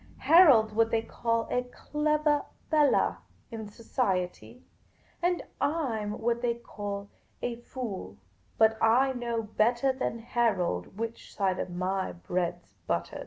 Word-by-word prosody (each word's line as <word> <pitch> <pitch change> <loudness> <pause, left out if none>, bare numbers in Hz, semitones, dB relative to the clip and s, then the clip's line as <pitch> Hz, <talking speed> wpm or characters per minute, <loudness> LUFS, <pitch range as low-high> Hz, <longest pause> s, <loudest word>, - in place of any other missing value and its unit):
Harold 285 -10 +7
's - - -14
what 225 +1 +3
they 225 -1 +1
call 230 0 -1
a 250 - +2
clevah 300 +3 0 0.2
fellah 300 -2 +3 0.3
in 220 -2 -6
society, 210 0 -2 0.6
and 350 0 +1 0.2
I 285 -7 0
'm 210 +1 -4
what 235 +1 0
they 240 -1 +1
call 205 -3 -6 0.3
a 240 -1 -2
fool; 235 - -6 0.4
but 220 0 +4
I 255 +4 +4
know 235 -2 -2
bettah 235 +5 +2
than 255 -3 -2
Harold 200 - -1
which 230 +1 -6
side 190 -3 0
of - - -3
my 185 +2 -2
bread 175 0 -2
's 100 - -32
buttahed." 85 0 -2
230 Hz, 140 wpm, -29 LUFS, 200-250 Hz, 0.6 s, Harold